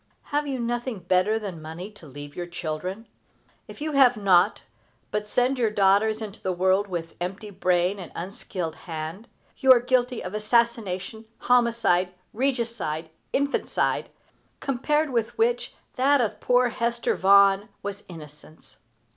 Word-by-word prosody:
Have 295 0 +1
you 270 -2 -2
nothing 240 -2 -3
better 185 +5 +2
than 195 -7 -6
money 165 +6 -7
to 190 -6 -15
leave 145 +1 -10
your 175 -1 -4
children? 180 +5 -5 0.6
If - - -12
you 310 +1 -2
have 260 -4 +5
not, 185 -4 +3 0.5
but 210 0 -2
send 250 +3 +1
your 230 -3 +3
daughters 210 +2 +3
into 205 -2 -9
the 185 - -1
world 190 +3 +2
with 170 -3 -5
empty 195 +4 -5
brain 180 0 +1
and 180 - -8
unskilled 180 -2 -5
hand, 165 +6 -7 0.3
you 265 - +6
are 250 - +8
guilty 250 0 0
of 180 - -6
assassination, 220 -2 0
homicide, 225 -7 +2 0.2
regicide, 230 - -2 0.2
infanticide 280 +1 0 0.5
compared 295 +3 0
with 230 -2 -1
which 465 +2 0 0.2
that 280 +2 +4
of 215 -3 -1
poor 250 0 +3
Hester 235 0 -1
Vaughan 200 +2 +5
was 200 0 -5
innocence. 150 -4 -13
210 Hz, 140 wpm, -25 LUFS, 180-240 Hz, 0.6 s, are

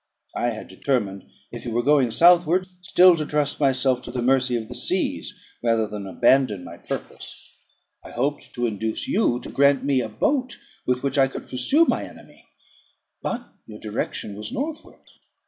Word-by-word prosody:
I 120 - 0
had 110 -2 -6
determined, 100 -1 -2 0.2
if 120 -1 -8
you 120 - -4
were 120 +1 +1
going 140 -2 +4
southward, 175 +6 +5 0.2
still 180 0 +6
to 155 - -1
trust 150 -1 -1
myself 130 -2 +2
to - - -8
the 125 - -3
mercy 130 -1 +2
of 110 -1 -6
the - - -8
seas - - -1 0.3
rather 115 -2 +2
than 105 -2 -7
abandon 105 -1 +2
my 85 -1 -10
purpose. - - -9 0.4
I - - -11
hoped 140 +4 -3
to 120 -1 -1
induce 110 0 -3
you 155 - +1
to - - -8
grant 140 0 +3
me 140 -2 +2
a 110 - -4
boat 255 - -1 0.3
with 125 +1 0
which 140 0 0
I 135 - +5
could 135 - -8
pursue 270 - +3
my - - 0
enemy. - - -14 0.7
But 240 +1 -4 0.2
your 105 -1 -10
direction 105 -1 -4
was 105 +1 -6
northward. 305 +5 -6
130 Hz, 175 wpm, -23 LUFS, 110-150 Hz, 0.7 s, still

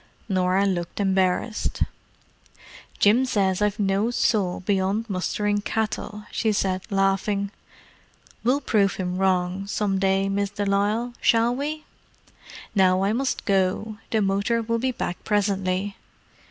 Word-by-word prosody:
Norah 185 0 +2
looked 175 -2 -2
embarrassed. 190 +3 +1 1.1
"Jim 220 +6 +4
says 195 -6 +1
I've 210 -1 +1
no 200 +2 +1
soul 205 -7 +1
beyond 195 +3 0
mustering 205 +1 -1
cattle," 210 -1 -3
she 220 - +1
said, 190 -2 0
laughing. 195 +1 +1 0.9
"We'll 260 +5 +2
prove 200 -7 +2
him 180 -1 -3
wrong, 190 0 0
some 200 -1 0
day, 195 0 +2
Miss 200 0 0
de 205 0 -3
Lisle, 210 +5 0
shall 230 +1 +3
we? 305 +3 -3 0.9
Now 185 -1 +3
I 200 +2 +2
must 265 +3 -1
go: 200 +2 0
the 220 -2 +1
motor 200 +4 +1
will 230 +1 -1
be 260 +2 0
back 180 -7 -4
presently." 195 -1 0
200 Hz, 125 wpm, -24 LUFS, 190-220 Hz, 1.1 s, Jim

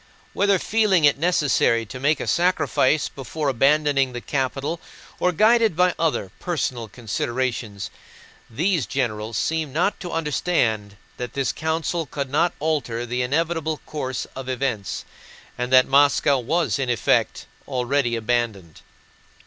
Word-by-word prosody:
Whether 200 -1 +3
feeling 200 -6 +2
it 145 -1 +4
necessary 145 -8 +2
to 130 +4 -8
make 145 +3 +2
a - - -3
sacrifice 170 -4 +2
before 140 +2 -4
abandoning 135 0 +2
the 120 - -4
capital 135 +5 -2 0.4
or 180 - +2
guided 220 +1 +4
by 180 +1 +3
other, 155 - 0
personal 130 -9 -2
considerations, 120 -2 -3 0.6
these 155 - 0
generals 110 -3 -2
seemed 155 -1 -1
not 180 +5 +1
to 175 - -6
understand 125 - 0 0.2
that 125 -1 -5
this 135 -2 0
council 160 +1 -2
could 140 -2 -4
not 170 +5 +2
alter 140 -7 -1
the 125 +1 -2
inevitable 160 +4 0
course 130 -4 -4
of 130 0 -6
events 125 -6 -2 0.5
and 125 +1 -3
that 130 -1 +7
Moscow 140 0 +4
was 160 +5 0
in 130 -2 -1
effect 120 - +1 0.2
already 130 -1 0
abandoned. 110 -7 -2
135 Hz, 135 wpm, -23 LUFS, 120-160 Hz, 0.6 s, that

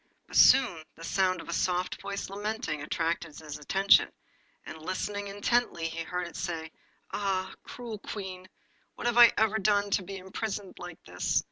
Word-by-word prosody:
But - - -11
soon 235 -12 +6
the 165 - -12
sound 185 +1 +1
of - - -13
a 170 - -3
soft 180 +1 0
voice 200 0 -4
lamenting 205 -6 -3
attracted 165 0 -2
his 150 -2 -7
attention, 195 +6 +4 0.5
and 160 - -8
listening 200 +4 -3
intently 205 -3 0
he 165 0 -5
heard 180 +2 -3
it 170 - -10
say 165 -2 -4 0.4
'Ah! 190 -2 -1
cruel 230 -4 -7
Queen! 185 -3 -7 0.5
what - - -7
have 240 0 +3
I 240 -1 +10
ever 220 0 +3
done 205 0 +2
to - - +3
be 195 +1 -7
imprisoned 195 +1 -5
like 175 -2 -9
this? 90 0 0
190 Hz, 165 wpm, -29 LUFS, 170-205 Hz, 0.5 s, I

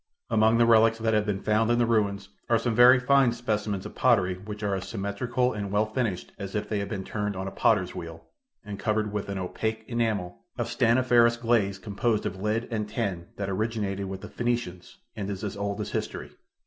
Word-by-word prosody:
Among 110 0 +4
the 120 - +5
relics 115 0 +5
that 110 0 0
have 105 0 +1
been 100 -1 -2
found 110 +1 +2
in 120 - +3
the 120 - +3
ruins 100 -3 0 0.2
are 115 - +5
some 115 +1 -1
very 125 +2 +7
fine 130 -1 +4
specimens 105 -4 -2
of 105 - -7
pottery 100 -8 +3
which 105 +3 -8
are 100 -1 0
as 95 -1 -3
symmetrical 120 +5 -1
and 100 -2 -4
well 105 +1 +2
finished 110 -4 -3
as 100 0 -6
if 105 0 -2
they 105 - -1
had 100 - -4
been 100 -4 -4
turned 105 0 -3
on 95 +1 -4
a - - -4
potter's - - +2
wheel, 80 -1 -8 0.4
and 100 -1 -6
covered 110 -1 0
with 105 -1 -3
an 100 - -3
opaque 110 +4 -3
enamel 110 -7 -1 0.2
of - - -2
stanniferous 120 0 +4
glaze 115 -5 +1
composed 105 +2 -1
of 95 - -4
lead 110 +3 -1
and 105 -2 -2
tin 100 -6 -3
that 100 - -3
originated 100 -1 -2
with 95 0 -6
the - - -7
Phoenicians, 120 -7 -3 0.2
and 100 -3 -4
is 100 0 -5
as 105 -1 -3
old 100 +1 -3
as 105 - -4
history. - - -4
105 Hz, 210 wpm, -27 LUFS, 100-115 Hz, 0.4 s, very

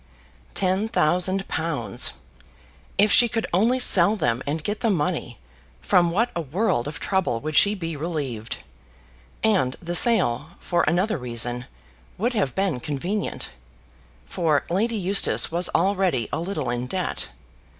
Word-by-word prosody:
Ten 190 +3 +1
thousand 185 +1 +2
pounds! 160 -2 -1 0.8
If 205 +1 +4
she 240 - +6
could 225 0 -2
only 225 +8 +3
sell 205 -5 +6
them 120 - -1
and 150 +2 -2
get 210 +4 -3
the 230 - 0
money, 160 - -2 0.4
from 175 -3 +3
what 230 +8 0
a 170 - -1
world 155 - -1
of 150 - -6
trouble 190 -12 -1
would 155 0 -4
she 205 +5 +5
be 165 -4 -5
relieved. 140 -8 -4 0.9
And 190 -13 +2
the 175 0 -5
sale, 175 - +3
for 175 - 0
another 180 +2 +1
reason, 120 0 -2 0.5
would 240 +6 -1
have 190 - -1
been 190 -9 0
convenient; 170 - -4 0.7
for 155 -6 0
Lady 225 +6 0
Eustace 195 -2 +2
was 175 +1 +1
already 185 - +1
a - - -1
little 165 -7 -3
in 120 +1 -3
debt. 185 +5 -3
175 Hz, 140 wpm, -23 LUFS, 145-200 Hz, 0.9 s, she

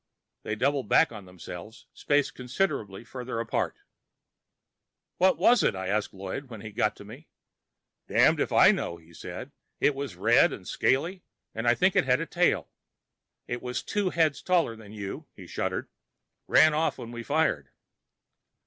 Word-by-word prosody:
They 110 - -3
doubled 135 0 0
back - - +5
on 105 -4 -9
themselves, 90 +4 -10
spaced 145 -1 +1
considerably 125 - -2
farther 125 0 -6
apart. 115 -1 -2 1.4
"What 185 +1 +4
was 245 +1 +5
it?" - - +2
I 95 0 -4
asked 105 +1 0
Lloyd 100 +8 -6
when 110 -4 -9
he 110 - -8
got 105 +1 0
to 100 - -12
me. 125 +10 -12 0.8
"Damned - - +4
if - - 0
I - - +7
know," 85 - -3
he 85 0 -20
said. - - -8 0.3
"It 145 - +3
was 135 -7 -5
red 90 - +4
and - - -9
scaly, 170 +8 0 0.3
and 115 +2 -3
I 120 - +5
think 190 +5 +2
it - - +4
had 125 +1 +3
a 165 - -2
tail. 175 +1 +1 0.8
It 120 0 -4
was 125 0 -4
two 205 -2 -1
heads 160 -4 +1
taller 175 -10 +1
than 110 -2 -13
you." 100 -2 -7
He - - -11
shuddered. - - -3 0.6
"Ran 155 0 +6
off 160 +2 0
when 115 - -8
we 120 0 -6
fired." 140 - 0
120 Hz, 165 wpm, -27 LUFS, 105-150 Hz, 1.4 s, I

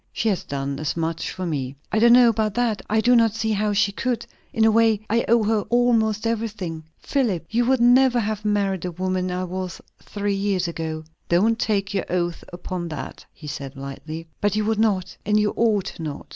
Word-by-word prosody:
"She 225 - 0
has 195 - -1
done 140 0 -4
as 155 +2 -2
much 165 0 -2
for 185 - -5
me." 140 -5 -3 0.2
"I 215 - +2
don't 235 +1 +6
know 245 -1 +7
about 215 -2 0
that. 235 -4 0
I 220 +1 +2
do 245 +2 +4
not 225 -2 +3
see 220 -1 -1
how 210 0 +1
she 205 0 +2
could. 245 +3 -2 0.3
In 220 - +2
a 220 - +5
way, 225 -1 +3
I 230 +1 +2
owe 235 0 +4
her 215 0 +1
almost 230 -3 +2
everything. 210 -8 -3
Philip, 220 - -1
you 235 +2 +2
would 260 -1 +3
never 245 +1 +5
have 215 -1 -2
married 200 -3 0
the 180 - -3
woman 185 +1 -2
I 180 +1 -2
was 185 0 -5 0.2
three 205 0 -3
years 195 -2 0
ago." 160 -1 -4 0.3
"Don't 220 +7 +3
take 200 -2 0
your 195 - -1
oath 175 -1 -1
upon 175 0 -5
that," 150 -5 -7
he 155 - -14
said 140 -2 -6
lightly. 155 +4 -7 0.2
"But 205 -1 +1
you 215 -1 0
would 220 0 0
not, 200 -5 +1
and 210 0 +2
you 210 0 +1
ought 215 -6 0
not." 150 -3 -5
205 Hz, 210 wpm, -23 LUFS, 175-225 Hz, 0.3 s, know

